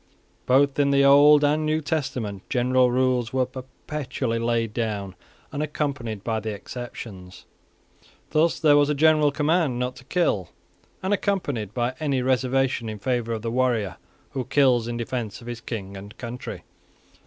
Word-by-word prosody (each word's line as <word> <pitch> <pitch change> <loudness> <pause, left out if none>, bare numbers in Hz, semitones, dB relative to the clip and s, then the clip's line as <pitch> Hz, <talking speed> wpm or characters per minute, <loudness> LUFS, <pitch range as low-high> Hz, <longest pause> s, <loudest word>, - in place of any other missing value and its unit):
Both 140 +2 +3
in 140 -1 +4
the 140 0 +4
Old 145 +2 +7
and 145 0 +4
in 155 - 0
the 155 - -2
New 155 - +1
Testament 130 -9 -3
general 125 0 +3
rules 125 -2 +1
were 130 -1 +1
perpetually 130 -1 -4
laid 115 -1 0
down 105 -5 -3 0.4
unaccompanied 140 -8 -3
by 110 -1 -1
the 110 +1 -4
exceptions. 100 -4 -8 0.9
Thus 160 +2 +2
there 150 -3 +5
was 145 0 +4
a 150 - +1
general 155 0 +4
command 150 -2 +1
not 125 +1 -2
to - - -13
kill, 105 - 0 0.5
unaccompanied 185 - -1
by 120 0 0
any 140 -4 0
reservation 130 -2 +1
in 110 - -5
favour 120 +1 -1
of 110 -1 -4
the 115 - -2
warrior 120 -6 0 0.3
who 130 -2 -3
kills 130 -4 +3
in 120 0 -3
defence 115 -3 -4
of 115 - -13
his 120 -1 -6
king 100 -4 -6
and 100 +3 -10
country. 120 0 -7
125 Hz, 160 wpm, -24 LUFS, 115-145 Hz, 0.9 s, Old